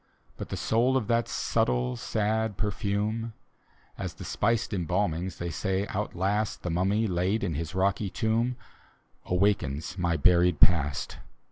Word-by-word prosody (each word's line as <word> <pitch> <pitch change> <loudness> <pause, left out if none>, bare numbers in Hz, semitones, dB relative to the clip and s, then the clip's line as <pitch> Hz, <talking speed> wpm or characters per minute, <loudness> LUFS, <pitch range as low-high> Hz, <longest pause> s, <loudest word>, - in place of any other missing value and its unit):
But - - -7
the - - -3
soul 125 +4 +2
of 125 - -1
that 115 0 +2
subtle 60 0 0
sad 110 - -1
perfume, 105 +2 -1 0.7
As - - -4
the - - -9
spiced 115 -3 0
embalmings, 90 -1 -1
they 85 0 -4
say, 95 +4 -1
outlast 100 +1 -1
The 90 - -2
mummy 95 +6 +1
laid 95 +3 0
in 90 -5 -1
his 80 +4 -4
roiiy 100 +1 0
tomb, 115 +2 0 0.7
Awakens 90 -3 0
my 85 -2 +1
buried 90 +1 +4
past. 75 -5 +2
95 Hz, 135 wpm, -28 LUFS, 85-110 Hz, 0.7 s, buried